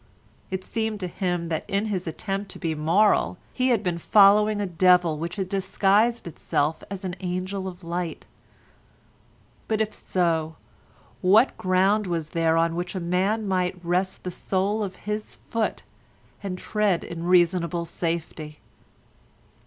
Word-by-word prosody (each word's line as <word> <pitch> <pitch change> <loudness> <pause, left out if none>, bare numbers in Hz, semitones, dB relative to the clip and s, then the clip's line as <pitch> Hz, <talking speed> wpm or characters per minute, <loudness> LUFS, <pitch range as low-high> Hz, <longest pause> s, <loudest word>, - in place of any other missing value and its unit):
It 190 0 -3
seemed 220 -1 -2
to 180 - -2
him 175 -2 -2
that 160 -1 -1
in 200 +2 0
his 190 -5 -3
attempt 195 +5 -4
to - - -9
be 165 -3 -2
moral 175 +5 +2 0.2
he 255 0 +1
had 235 -5 +2
been 175 -2 -1
following 210 +3 +5
a 205 - 0
devil 180 -3 +3
which 170 +2 -4
had 190 -3 -2
disguised 200 +4 +2
itself 155 -1 -1
as 195 -1 -6
an 180 -1 -3
angel 185 +1 -3
of 180 0 -9
light. 170 0 -4 1.4
But 220 -1 0
if 220 -1 0
so, 160 -3 -1 0.7
what 210 +8 +5
ground 190 +3 +2
was 165 -3 -2
there 165 -1 +2
on 165 0 +2
which 175 +2 -4
a - - -1
man 190 +5 0
might 185 -1 0
rest 185 +2 0
the 180 - -4
sole 195 +4 -1
of 195 -3 -3
his 210 0 -4
foot 225 -1 -3 0.6
and 190 -3 -4
tread 205 -3 0
in 170 0 -6
reasonable 175 -1 +2
safety? 165 -2 -4
185 Hz, 150 wpm, -25 LUFS, 170-200 Hz, 1.4 s, following